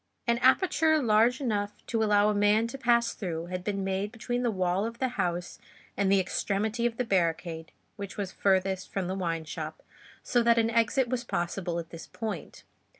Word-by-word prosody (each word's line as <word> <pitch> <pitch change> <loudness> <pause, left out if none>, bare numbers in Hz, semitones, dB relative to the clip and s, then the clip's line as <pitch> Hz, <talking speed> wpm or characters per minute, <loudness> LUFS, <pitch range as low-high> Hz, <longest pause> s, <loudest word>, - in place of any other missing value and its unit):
An 235 0 +2
aperture 315 +4 +4
large 235 0 +3
enough 210 -6 -1
to 225 -2 -1
allow 210 -1 +4
a - - +2
man 205 +2 +3
to 270 - -6
pass 235 -2 +3
through 170 -4 -4
had 180 +1 -5
been 200 0 -2
made 195 +2 -2
between 245 +2 -3
the 245 - +1
wall 185 -1 0
of 230 +1 -4
the 260 +1 0
houses 175 -6 -3 0.4
and 195 -1 +1
the 195 - +5
extremity 210 +5 0
of 230 -1 -6
the 250 - +1
barricade 165 -4 -1 0.3
which 200 -2 -7
was 200 -3 -3
furthest 190 -1 0
from 190 -2 -2
the 185 - -2
wine 165 -4 -2
shop, 155 0 -6 0.4
so 245 - +2
that 235 0 +4
an 225 0 +2
exit 230 +3 +2
was 245 0 -2
possible 175 -4 -2
at 170 -1 -6
this 165 - -9
point. 215 -7 -6
205 Hz, 195 wpm, -28 LUFS, 180-235 Hz, 0.4 s, the